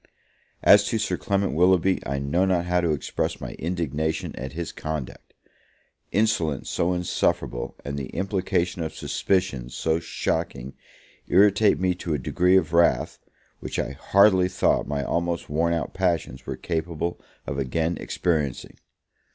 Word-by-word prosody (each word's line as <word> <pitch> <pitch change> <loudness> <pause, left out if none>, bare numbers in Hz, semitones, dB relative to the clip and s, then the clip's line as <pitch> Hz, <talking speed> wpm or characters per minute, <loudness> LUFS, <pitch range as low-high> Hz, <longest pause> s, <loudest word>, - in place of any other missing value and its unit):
As 100 0 +7
to 115 - 0
Sir 105 - -1
Clement 100 -1 0
Willoughby, 90 +2 +3
I 70 +1 -1
know 70 +7 +1
not 90 -2 +1
how 90 0 +1
to 85 - 0
express 75 -3 -2
my - - -6
indignation 80 -2 -2
at 65 +1 -6
his 85 0 -4
conduct. 75 -4 -6 0.8
Insolence 90 - 0
so 90 +2 +1
insufferable, 90 -8 -1
and 70 0 -3
the 65 - -5
implication 95 -2 -1
of 80 - -4
suspicions 70 -11 -1
so 80 0 0
shocking, 80 -5 -3 0.5
irritate 100 +2 +4
me 90 -1 +2
to 85 -3 -3
a - - 0
degree 90 +7 +3
of 80 -3 0
wrath, 85 0 +3 0.4
which - - -5
I - - -1
hardly 95 +5 +4
thought - - +1
my 70 0 -2
almost 85 +2 -2
worn 85 +3 +1
out 80 -6 -2
passions 85 -8 -1
were - - -4
capable 85 0 -3 0.3
of 70 - -3
again 80 +6 -1
experiencing. 75 -7 -2
85 Hz, 145 wpm, -25 LUFS, 75-90 Hz, 0.8 s, As